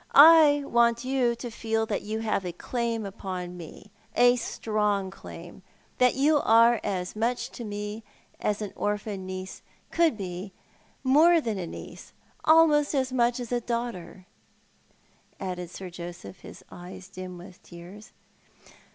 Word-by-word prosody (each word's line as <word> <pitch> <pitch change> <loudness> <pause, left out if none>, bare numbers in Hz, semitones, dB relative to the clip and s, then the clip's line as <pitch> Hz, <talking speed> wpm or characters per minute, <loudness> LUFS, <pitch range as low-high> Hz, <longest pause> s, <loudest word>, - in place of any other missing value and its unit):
I 300 -1 +8
want 235 -1 +2
you 255 -3 +1
to 240 0 -7
feel 225 0 -1
that 210 -2 -2
you 220 +2 -4
have 215 -3 -1
a 180 - -4
claim 230 +2 -3
upon 185 -2 -6
me, 180 +4 -11 0.2
a 245 0 +6
strong 210 -4 -1
'claim 175 -1 -11 0.2
— - - -35
that 250 -1 +4
you 295 +3 +3
are 230 -1 +5
as 185 -2 -3
much 235 +3 -1
to 240 - -8
me 210 +1 -5 0.4
as 210 0 -1
an 205 - -6
orphan 205 -2 -3
niece 185 0 -7 0.3
could 330 -9 +2
be 185 0 -6 0.2
— - - -35 0.2
more 315 +6 +5
than 225 -9 -3
a 175 - -4
niece - - -10 0.2
— - - -34
almost 310 -2 +5
as 260 -1 0
much 240 -1 +2
as 245 -1 -6
a 245 -1 0
daughter," 230 -6 -5 1.1
added 180 -2 -5
Sir 185 0 -8
Joseph, 175 +1 -9
his - - -12
eyes 180 +1 -10
dim 185 -2 -8
with 180 +1 -13
tears. 185 +6 -13
215 Hz, 155 wpm, -27 LUFS, 185-245 Hz, 1.1 s, I